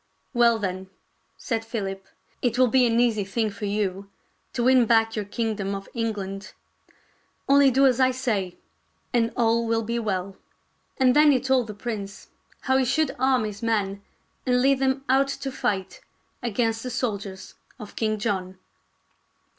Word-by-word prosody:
" -, -, -45 dB
Well, 235 Hz, -2 st, +4 dB
then," 190 Hz, -2 st, -4 dB, 0.5 s
said 225 Hz, -4 st, -2 dB
Philip, 195 Hz, -4 st, -5 dB, 0.2 s
" -, -, -39 dB
it 245 Hz, -1 st, 0 dB
will 255 Hz, -1 st, +4 dB
be 255 Hz, 0 st, +4 dB
an 230 Hz, 0 st, +2 dB
easy 230 Hz, -4 st, +2 dB
thing 215 Hz, +2 st, -1 dB
for 200 Hz, +1 st, -6 dB
you 200 Hz, -1 st, -2 dB, 0.4 s
to 240 Hz, -, -1 dB
win 255 Hz, -1 st, +5 dB
back 225 Hz, -1 st, +3 dB
your 210 Hz, -2 st, -2 dB
kingdom 205 Hz, -2 st, -2 dB
of 195 Hz, 0 st, -7 dB
Eng 230 Hz, -2 st, -1 dB
land. 195 Hz, 0 st, -7 dB, 0.9 s
Only 280 Hz, 0 st, +6 dB
do 270 Hz, +2 st, +4 dB
as 260 Hz, -1 st, +3 dB
I 260 Hz, 0 st, +5 dB
say, 220 Hz, -8 st, -2 dB, 0.6 s
and 230 Hz, -1 st, +2 dB
all 230 Hz, -1 st, +2 dB
will 225 Hz, 0 st, +1 dB
be 235 Hz, +2 st, -2 dB
well." 195 Hz, -3 st, -3 dB, 0.6 s
And 255 Hz, -1 st, +4 dB
then 300 Hz, 0 st, +7 dB
he 265 Hz, -, +3 dB
told 260 Hz, -2 st, +1 dB
the 210 Hz, -, -7 dB
prince 200 Hz, -2 st, -6 dB, 0.3 s
how 260 Hz, 0 st, +2 dB
he 265 Hz, -, +2 dB
should 310 Hz, +5 st, 0 dB
arm 260 Hz, -2 st, +3 dB
his 210 Hz, -1 st, -5 dB
men 205 Hz, -4 st, -1 dB, 0.4 s
and 250 Hz, -1 st, +2 dB
lead 275 Hz, 0 st, +3 dB
them 270 Hz, 0 st, 0 dB
out 270 Hz, +1 st, +3 dB
to 275 Hz, 0 st, -4 dB
fight 195 Hz, -7 st, -3 dB, 0.4 s
against 225 Hz, -1 st, -1 dB
the 255 Hz, -, -5 dB
soldiers 200 Hz, -6 st, -4 dB, 0.2 s
of 215 Hz, -5 st, -10 dB
King 215 Hz, -1 st, 0 dB
John. 190 Hz, -3 st, -3 dB
230 Hz, 170 wpm, -25 LUFS, 200-255 Hz, 0.9 s, then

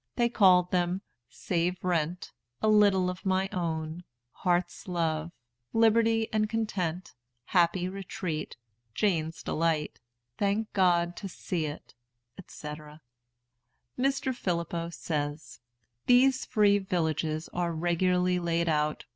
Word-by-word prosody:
They 240 Hz, -1 st, +2 dB
called 185 Hz, -5 st, +5 dB
them 180 Hz, +1 st, 0 dB, 0.3 s
"Save 175 Hz, 0 st, -2 dB
Rent," 175 Hz, -1 st, -1 dB, 0.3 s
"A -, -, 0 dB
Little 205 Hz, -3 st, +5 dB
of 180 Hz, +1 st, -5 dB
My 190 Hz, -1 st, +1 dB
Own," 160 Hz, -1 st, -3 dB, 0.3 s
"Heart's 180 Hz, +5 st, -1 dB
Love," 165 Hz, -2 st, -1 dB, 0.4 s
"Liberty 225 Hz, 0 st, +3 dB
and 215 Hz, -1 st, +1 dB
Content," 185 Hz, -6 st, -2 dB, 0.3 s
"Happy 175 Hz, 0 st, +2 dB
Retreat," 185 Hz, -5 st, -5 dB, 0.4 s
"Jane's 165 Hz, -5 st, 0 dB
Delight," 160 Hz, -2 st, -1 dB, 0.4 s
"Thank 205 Hz, +2 st, 0 dB
God 175 Hz, -2 st, +2 dB
to 195 Hz, -, -6 dB
see 170 Hz, -3 st, -3 dB
It," 145 Hz, -1 st, -9 dB, 0.5 s
&c. 150 Hz, -, -9 dB, 1.3 s
Mr. 270 Hz, 0 st, 0 dB
Phillippo 170 Hz, -3 st, -2 dB
says: 150 Hz, -2 st, -4 dB, 0.5 s
"These 255 Hz, +1 st, +5 dB
free 205 Hz, -4 st, +3 dB
villages 160 Hz, -4 st, -1 dB
are 175 Hz, -1 st, -1 dB
regularly 180 Hz, +2 st, +1 dB
laid 170 Hz, 0 st, 0 dB
out. 150 Hz, -1 st, 0 dB
180 Hz, 110 wpm, -29 LUFS, 165-200 Hz, 1.3 s, called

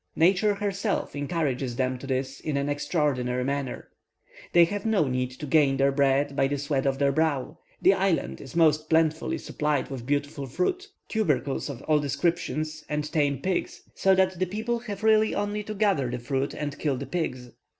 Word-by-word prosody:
Nature 195 Hz, +5 st, +3 dB
herself 200 Hz, -2 st, -2 dB
encourages 140 Hz, -4 st, -1 dB
them 130 Hz, 0 st, 0 dB
to 135 Hz, -, -8 dB
this 135 Hz, +1 st, -2 dB
in 150 Hz, -2 st, -2 dB
an 140 Hz, 0 st, -1 dB
extraordinary 145 Hz, -4 st, 0 dB
manner. 140 Hz, -1 st, -3 dB, 0.6 s
They 175 Hz, -1 st, +7 dB
have 205 Hz, +3 st, -4 dB
no 215 Hz, -9 st, +2 dB
need 125 Hz, -1 st, -1 dB
to 130 Hz, -, -7 dB
gain 140 Hz, -2 st, +3 dB
their 135 Hz, +1 st, +3 dB
bread 140 Hz, 0 st, +2 dB
by 135 Hz, -, +3 dB
the 145 Hz, +1 st, -1 dB
sweat 140 Hz, -1 st, -1 dB
of 135 Hz, 0 st, +1 dB
their 140 Hz, 0 st, +2 dB
brow; 155 Hz, -3 st, 0 dB, 0.2 s
the -, -, +5 dB
island 65 Hz, +1 st, 0 dB
is -, -, -11 dB
most 155 Hz, -2 st, +3 dB
plentifully 160 Hz, 0 st, +2 dB
supplied 150 Hz, -2 st, -2 dB
with 125 Hz, -3 st, -6 dB
beautiful 145 Hz, -1 st, -1 dB
fruit, 345 Hz, -, -1 dB, 0.2 s
tubercles 145 Hz, -, 0 dB
of 140 Hz, -2 st, -7 dB
all 155 Hz, -1 st, +3 dB
descriptions, 155 Hz, +1 st, -1 dB
and 150 Hz, 0 st, -2 dB
tame 145 Hz, -3 st, +1 dB
pigs, 190 Hz, -1 st, -2 dB
so 190 Hz, 0 st, +3 dB
that 185 Hz, -1 st, +2 dB
the 185 Hz, -, +1 dB
people 220 Hz, +5 st, -2 dB
have 215 Hz, -3 st, -7 dB
really 220 Hz, 0 st, +4 dB
only 205 Hz, +1 st, -1 dB
to 215 Hz, +1 st, -6 dB
gather 195 Hz, -, +2 dB
the 125 Hz, -, -3 dB
fruit 135 Hz, +3 st, -2 dB
and 145 Hz, -1 st, -4 dB
kill 140 Hz, -4 st, 0 dB
the -, -, -5 dB
pigs. 130 Hz, -8 st, -3 dB
150 Hz, 185 wpm, -26 LUFS, 135-180 Hz, 0.6 s, They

